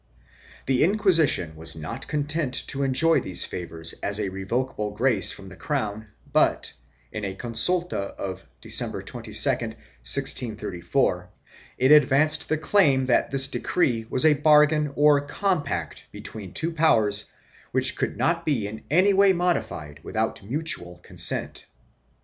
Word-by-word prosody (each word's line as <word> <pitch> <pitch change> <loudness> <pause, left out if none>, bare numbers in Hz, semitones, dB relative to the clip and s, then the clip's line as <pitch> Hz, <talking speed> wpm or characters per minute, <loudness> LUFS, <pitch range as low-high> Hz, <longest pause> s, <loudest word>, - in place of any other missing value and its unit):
1 - - -30
The 130 -2 +2
Inquisition 165 - +2
was 80 +1 -6
not 80 -1 -7
content 145 -2 -2
to 140 - -3
enjoy 140 +5 +3
these 95 - 0
favors 80 -2 -4
as 100 +1 0
a 100 -2 -2
revocable 105 +3 -3
grace 110 0 +1
from 95 - -10
the 95 - -11
crown 110 -5 -4 0.3
but, - - +2 0.4
in 110 - -6
a 95 -1 -4
consulta 120 - -1
of 95 -1 -6 0.2
December - - +1
22, - - -7
1634, 90 - -1 0.5
it 130 +3 +3
advanced 150 +1 +4
the 155 - +1
claim 155 -5 +2
that 125 -2 +1
this 135 0 +3
decree 120 -11 -1
was 130 - +2
a 155 - +6
bargain 150 0 +3
or 145 -1 +4
compact 150 +1 -3
between 100 -5 -8
two 165 +1 -2
powers 110 -11 +2 0.5
which - - +3
could - - -3
not 165 0 0
be 130 -11 -1
in 110 +1 -9
any 185 +7 +4
way 195 0 +5
modified 170 - -2
without 110 0 -3
mutual 100 - -3
consent. - - -1
130 Hz, 140 wpm, -24 LUFS, 100-155 Hz, 0.5 s, a